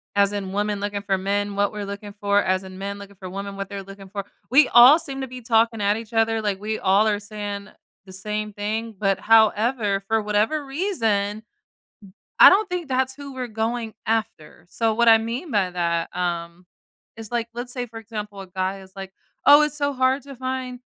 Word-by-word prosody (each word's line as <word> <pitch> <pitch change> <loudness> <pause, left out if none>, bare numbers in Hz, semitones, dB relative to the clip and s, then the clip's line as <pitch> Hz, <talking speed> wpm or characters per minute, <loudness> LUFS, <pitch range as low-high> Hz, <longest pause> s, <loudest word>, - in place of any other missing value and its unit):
as 200 0 +4
in 195 -2 -4
women 205 0 -1
looking 205 0 -3
for 200 -1 0
men, 200 +1 -1
what 205 0 +2
we're 210 -1 -5
looking 200 +1 -7
for, 205 0 +1
as 185 0 0
in 185 0 -10
men 200 +1 -5
looking 200 0 -12
for 185 -1 -8
women, 200 +1 -6
what 195 0 -4
they're 200 -1 -6
looking 195 0 -12
for. 200 -1 -5 0.2
We 270 +3 +6
all 250 +7 +8
seem 275 -5 -6
to 265 - -4
be 250 0 -9
talking 225 -1 +2
at 205 +1 +2
each 225 0 -9
other, 225 0 +2
like, 205 -2 -2
we 215 +1 -3
all 200 +3 +3
are 205 - 0
saying 205 -1 -6 0.4
the 190 - -12
same 210 +2 -4
thing, 220 +2 -3
but, 195 -1 +1
however, 220 -1 +3
for 220 +1 +1
whatever 215 +8 0
reason, 225 - -1 1.0
I - - +11
don't 400 +1 +2
think 360 -4 -3
that's 260 0 0
who 285 -1 -9
we're 255 -1 -4
going 225 0 -3
after. 215 -8 -3
So 225 +2 0
what 235 +1 +4
I 225 - +8
mean 235 +9 -4
by 195 -4 +1
that, 170 -1 -2
um, 170 0 -3 0.5
is 225 0 -9
like, 235 -1 -1
let's 245 +1 -6
say, 250 -2 -3
for 225 - -11
example, 210 -2 -7
a 190 - -10
guy 190 +1 -3
is 190 - -15
like, 195 -1 -8 0.3
"Oh, 290 +1 +9
it's 300 0 -2
so 285 -1 0
hard 260 +1 +2
to 275 0 -10
find 255 0 -4
210 Hz, 210 wpm, -23 LUFS, 200-240 Hz, 1.0 s, I